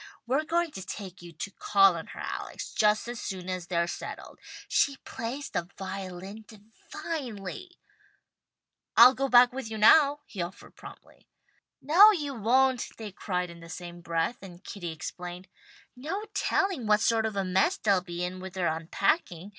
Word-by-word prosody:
We're 270 Hz, +6 st, 0 dB
going 340 Hz, 0 st, 0 dB
to 190 Hz, -, -7 dB
take 190 Hz, -2 st, -8 dB
you 175 Hz, -1 st, -11 dB
to 175 Hz, +6 st, -6 dB
call 195 Hz, -2 st, +4 dB
on 165 Hz, -, -6 dB
her, -, -, -10 dB
Alex, -, -, -6 dB
just 215 Hz, 0 st, +2 dB
as 240 Hz, 0 st, -5 dB
soon 185 Hz, -2 st, -5 dB
as 185 Hz, -2 st, -4 dB
they're 170 Hz, -1 st, +1 dB
settled. 170 Hz, -, -7 dB, 0.3 s
She 280 Hz, -1 st, +2 dB
plays 255 Hz, +5 st, -5 dB
the 170 Hz, +1 st, -3 dB
violin 190 Hz, +2 st, -7 dB
divinely." 225 Hz, -, -7 dB, 1.2 s
"I'll 245 Hz, +2 st, +10 dB
go 270 Hz, +1 st, -1 dB
right 270 Hz, -, -4 dB
back 245 Hz, 0 st, +7 dB
with 265 Hz, -4 st, -5 dB
you 220 Hz, -, -5 dB
now," 285 Hz, +6 st, +6 dB
he 200 Hz, -, -6 dB
offered 175 Hz, +2 st, -8 dB
promptly. -, -, -14 dB, 0.6 s
"No 355 Hz, +9 st, +8 dB
you 300 Hz, -9 st, -1 dB
won't," 255 Hz, +2 st, +2 dB
they 220 Hz, -2 st, -7 dB
cried 180 Hz, -2 st, -3 dB
in 170 Hz, -, -13 dB
the 165 Hz, 0 st, -12 dB
same 175 Hz, 0 st, -8 dB
breath, 165 Hz, +6 st, -1 dB
and 185 Hz, -1 st, -12 dB
Kitty 175 Hz, -5 st, -6 dB
explained, 175 Hz, +3 st, -7 dB, 0.5 s
"No 330 Hz, +12 st, -4 dB
telling 390 Hz, -, 0 dB
what 210 Hz, 0 st, +4 dB
sort 225 Hz, -1 st, +2 dB
of 215 Hz, -, -6 dB
a 195 Hz, -1 st, 0 dB
mess 190 Hz, -, +2 dB
they'll 200 Hz, -3 st, +2 dB
be 175 Hz, -1 st, -5 dB
in 180 Hz, +1 st, -4 dB
with 185 Hz, -1 st, -8 dB
their 175 Hz, -4 st, 0 dB
unpacking. 175 Hz, -, -1 dB
205 Hz, 170 wpm, -28 LUFS, 180-260 Hz, 1.2 s, I'll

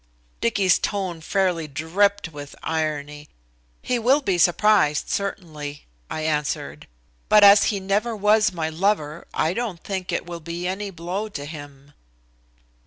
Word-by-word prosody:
Dicky's 185 Hz, -, +2 dB
tone 190 Hz, -5 st, -2 dB
fairly 180 Hz, -2 st, 0 dB
dripped 175 Hz, +6 st, 0 dB
with 145 Hz, -1 st, -9 dB
irony. 150 Hz, -2 st, -3 dB, 0.5 s
"He 250 Hz, -1 st, 0 dB
will 255 Hz, +5 st, +4 dB
be 195 Hz, -10 st, -1 dB
surprised 175 Hz, -4 st, +3 dB
certainly," 155 Hz, -7 st, -4 dB, 0.2 s
I 155 Hz, -, -4 dB
answered, 150 Hz, -1 st, -2 dB, 0.4 s
"but 210 Hz, -1 st, +7 dB
as 200 Hz, 0 st, +8 dB
he 205 Hz, -, 0 dB
never 205 Hz, +4 st, 0 dB
was 210 Hz, +1 st, +3 dB
my 165 Hz, -3 st, -2 dB
lover, 160 Hz, -2 st, -1 dB
I 160 Hz, -, 0 dB
don't 215 Hz, -6 st, -4 dB
think 190 Hz, -2 st, -4 dB
it -, -, -2 dB
will 170 Hz, -1 st, -7 dB
be 170 Hz, +2 st, -5 dB
any 200 Hz, +2 st, -3 dB
blow 185 Hz, +4 st, -4 dB
to 145 Hz, -8 st, -6 dB
him." 145 Hz, -2 st, -11 dB
175 Hz, 140 wpm, -23 LUFS, 155-200 Hz, 0.5 s, as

